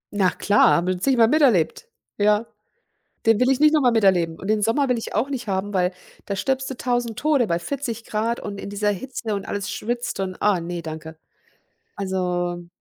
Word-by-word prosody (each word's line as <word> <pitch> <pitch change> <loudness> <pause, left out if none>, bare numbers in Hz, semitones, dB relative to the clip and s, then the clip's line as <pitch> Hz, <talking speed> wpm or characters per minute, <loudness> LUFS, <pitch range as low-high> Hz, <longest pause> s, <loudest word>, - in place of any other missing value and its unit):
Na 190 -3 +3
klar, 205 +3 +3
habe 175 +2 +1
ich 180 -1 -4
zigmal 245 -3 +4
miterlebt, 260 - +2 0.3
ja. 210 +2 +3 0.8
Den 225 -1 +5
will 250 +1 +4
ich 270 - +1
nicht 305 0 +6
noch 305 -2 +3
mal 245 - +4
miterleben. 185 -7 +2
Und 195 - -7
den 215 0 +1
Sommer 255 +5 +1
will 250 - +2
ich 225 - -6
auch 235 +6 0
nicht 255 -4 -4
haben, 195 +1 -2
weil 180 -1 +2 0.3
da 200 - -3
stirbst 265 +5 -1
du - - -5
1.000 240 -3 -1
Tode 290 -5 +2
bei 170 -4 0
40 235 +2 -4
C 225 +2 -2
und 200 -1 -6
in - - -6
dieser 205 +1 0
Hitze 220 +1 -3
und 200 -1 -5
alles 200 -1 -3
schwitzt 240 0 -3
und 185 -1 -4
ah, 205 -4 +3
ne, 170 0 -5
danke. 160 0 -8 0.8
Also 180 -2 -2
210 Hz, 200 wpm, -23 LUFS, 185-245 Hz, 0.8 s, nicht